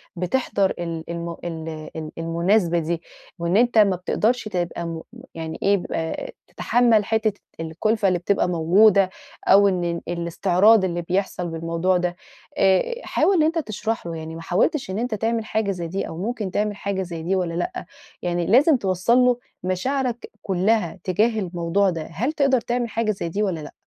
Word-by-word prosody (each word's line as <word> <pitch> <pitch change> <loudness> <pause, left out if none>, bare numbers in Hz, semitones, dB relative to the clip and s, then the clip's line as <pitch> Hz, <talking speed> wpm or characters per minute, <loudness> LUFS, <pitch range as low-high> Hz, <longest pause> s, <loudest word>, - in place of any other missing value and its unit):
بتحضَر 195 +2 0
ال 165 -2 -4
الم 170 0 -4
ال 160 -2 -6
ال 155 -1 -5
المناسبة 170 +2 +1
دي، 165 +1 -2 0.4
وإن 170 +3 +1
أنت 240 0 +3
ما 200 -3 +5
بتقدَرش 220 +7 0
تبقى 175 -3 -3
مم 165 -1 -5 0.3
يعني 160 -1 -5
إيه 200 0 +4
ب 180 - -7 0.6
تتحمل 235 -4 +2
حتّة 220 0 +1 0.3
الكُلفَة 195 +7 0
اللي 180 -2 +2
بتبقى 195 +3 +1
موجودة، 185 +4 +4 0.4
أو 200 +1 +7
إن 185 -2 0
ال 170 0 -2
الإستعراض 180 +5 +3
اللي 175 -1 -2
بيحصَل 180 0 -2
بالموضوع 165 +2 0
ده 175 0 -1 0.4
آآ، 195 - +3
حاول 390 - +2
إن 320 - +4
أنت 325 +2 +1
تشرَحه. 215 - -3
يعني 160 0 -7
ما 165 - -7
حاولتش 190 - 0
إن 190 +3 -2
أنت 240 -1 -1
تعمل 225 +1 -1
حاجة 220 -2 0
زي 175 -3 -4
دي، 190 +4 -3
أو 160 - -7
ممكن 210 +1 -3
تعمل 210 +1 -1
حاجة 200 -1 -3
زي 170 -3 -5
دي 185 +4 0
والّا 180 -3 -1
لأ؟ 360 - -3 0.4
يعني 175 -1 -1
لازم 270 - +5
توصَّل 190 +3 +1
له 250 -1 +4 0.2
مشاعرك 240 +7 -2
كلّها 190 -1 0
تجاه 215 +4 +1
الموضوع 180 +1 0
ده. 165 -3 -4
هل 240 - -1
تقدَر 275 -5 +2
تعمل 240 0 -2
حاجة 220 0 0
زي 190 -4 -4
دي 205 +5 -1
والّا 185 -5 -1
لأ؟ 150 - -9
190 Hz, 175 wpm, -23 LUFS, 170-220 Hz, 0.6 s, أو